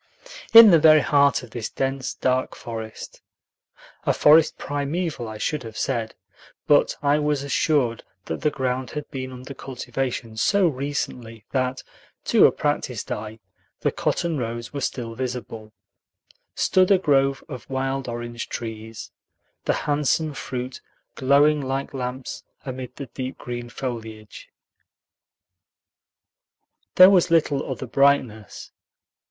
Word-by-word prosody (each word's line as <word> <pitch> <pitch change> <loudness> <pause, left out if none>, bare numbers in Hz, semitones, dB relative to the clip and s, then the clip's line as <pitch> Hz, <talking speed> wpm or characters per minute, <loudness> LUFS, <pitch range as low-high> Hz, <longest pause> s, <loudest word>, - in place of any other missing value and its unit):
In 225 -2 +11
the 165 - +6
very 155 -1 +7
heart 140 -2 +3
of 120 - -12
this 115 -2 -4
dense, 135 -1 -3
dark 130 0 0
forest 110 -2 -8 0.8
(a - - +2
forest 155 +1 +5
primeval, 145 -2 -3
I 110 0 -7
should 150 +6 -2
have 110 -2 -9
said, 115 -4 -2 0.5
but - - +4
I 145 +1 +3
was 150 -2 0
assured 140 -4 +1 0.2
that 80 - -5
the 150 - +2
ground 130 -2 -2
had 150 -1 -6
been 130 -1 -5
under 130 +2 -9
cultivation 125 -3 -5
so 195 - +3
recently 125 -6 -4
that, 130 -1 -1 0.4
to - - +6
a - - +1
practiced - - -2
eye, 110 +1 -5 0.4
the - - +1
cotton 165 -4 -1
rows 115 +1 -5
were 140 - -4
still 120 -3 -3
visible) 115 -3 -6 0.8
stood 185 -1 +3
a 195 - +6
grove 135 -5 +2
of 130 -6 -9
wild 135 0 -2
orange 120 0 -6
trees, 110 -1 -7 0.5
the - - +2
handsome 150 +1 +1
fruit 130 -1 -6 0.3
glowing 145 +3 +3
like 135 +1 -3
lamps 130 -1 -5 0.2
amid 130 -1 -6
the 140 - -6
deep 130 +1 -6
green 120 -1 -6
foliage. 110 -4 -7 2.5
There 185 +1 +9
was 185 -3 +4
little 155 -5 +1
other 130 - -5
brightness. 125 -5 0
130 Hz, 130 wpm, -23 LUFS, 120-145 Hz, 2.5 s, In